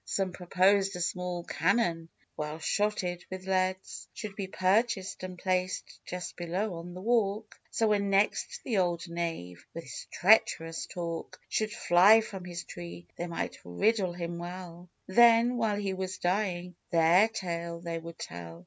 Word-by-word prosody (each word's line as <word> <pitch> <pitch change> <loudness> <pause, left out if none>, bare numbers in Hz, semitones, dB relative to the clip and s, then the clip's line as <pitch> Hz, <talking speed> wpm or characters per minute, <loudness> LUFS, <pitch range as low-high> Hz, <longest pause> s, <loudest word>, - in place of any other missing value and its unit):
Some 190 -2 -1
proposed 190 +2 +2
a - - -5
small 180 0 -2
cannon, 170 -2 +1 0.3
well 150 0 -4
shotted 180 0 -1
with 185 0 -7
leads, 185 0 -1
Should 210 -3 -6
be 195 -2 -4
purchased, 190 +2 +1
and 185 -1 -6
placed 185 0 -2
just 180 0 -5
below 180 +4 -2
on 175 +1 -8
the 185 - -7
walk, 215 -1 0
So, 225 -1 +1
when 200 -1 +2
next 205 - +1
the 220 -6 +1
old 175 -1 0
knave, 165 - -4
with 165 - -5
his - - -8
treacherous 165 -5 +3
talk, 170 -2 -5
Should 215 -1 0
fly 210 +1 +6
from 195 -4 -7
his 175 -1 -5
tree, 175 0 -9
they 175 - -4
might 170 - -4
riddle 185 - +1
him 170 -1 -4
well; 175 0 -8 0.2
Then, 235 +4 +6
while 220 -3 +1
he 200 -2 -1
was 185 0 -4
dying, 180 -1 -1 0.2
their 170 +5 +5
tale 170 -5 -4
they 170 -1 -4
would 165 0 -9
tell. 85 -1 -8
185 Hz, 155 wpm, -30 LUFS, 170-200 Hz, 0.3 s, fly